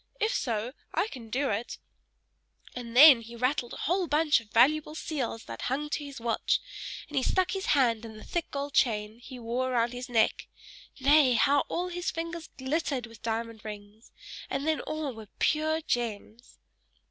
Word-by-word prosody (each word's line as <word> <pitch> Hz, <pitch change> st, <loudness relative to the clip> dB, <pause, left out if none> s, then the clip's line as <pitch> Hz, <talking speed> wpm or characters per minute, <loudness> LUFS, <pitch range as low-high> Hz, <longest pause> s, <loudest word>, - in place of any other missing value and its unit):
If 440 Hz, +2 st, +1 dB
so, 235 Hz, -, -2 dB, 0.2 s
I 435 Hz, -, +1 dB
can 235 Hz, -, -10 dB
do 270 Hz, +3 st, 0 dB
it"; 220 Hz, +4 st, -3 dB, 1.0 s
and 240 Hz, -1 st, -5 dB
then 280 Hz, -4 st, +10 dB
he 230 Hz, +1 st, -10 dB
rattled 250 Hz, 0 st, -1 dB
a -, -, -6 dB
whole 360 Hz, +3 st, +1 dB
bunch 300 Hz, -2 st, +3 dB
of 225 Hz, -2 st, -16 dB
valuable 300 Hz, +7 st, +3 dB
seals 270 Hz, -9 st, -3 dB
that -, -, -8 dB
hung 295 Hz, +3 st, -2 dB
to 300 Hz, -, -2 dB
his 280 Hz, -2 st, -8 dB
watch, 230 Hz, 0 st, +1 dB, 0.5 s
and 295 Hz, -, -9 dB
he -, -, +4 dB
stuck 370 Hz, +7 st, +1 dB
his 385 Hz, -1 st, -3 dB
hand 235 Hz, -4 st, +2 dB
in 220 Hz, -1 st, -9 dB
the -, -, -11 dB
thick 345 Hz, -2 st, -3 dB
gold 280 Hz, 0 st, -4 dB
chain 215 Hz, -1 st, +1 dB
he 250 Hz, +1 st, -10 dB
wore 245 Hz, +2 st, -2 dB
around 235 Hz, -1 st, +1 dB
his 250 Hz, 0 st, -6 dB
neck 225 Hz, -2 st, +2 dB, 0.5 s
nay! 280 Hz, -1 st, +5 dB
how 280 Hz, +5 st, +3 dB
all 360 Hz, +1 st, -2 dB
his 355 Hz, +1 st, -3 dB
fingers 335 Hz, 0 st, -5 dB
glittered 270 Hz, -2 st, -1 dB
with 230 Hz, -2 st, -15 dB
diamond 225 Hz, -1 st, -3 dB
rings; 210 Hz, +1 st, -10 dB, 0.4 s
and 275 Hz, +1 st, -2 dB
then 315 Hz, -1 st, +2 dB
all 310 Hz, -3 st, -4 dB
were 220 Hz, -2 st, -10 dB
pure 315 Hz, +1 st, +1 dB
gems. 235 Hz, -3 st, -4 dB
255 Hz, 180 wpm, -29 LUFS, 230-305 Hz, 1.0 s, then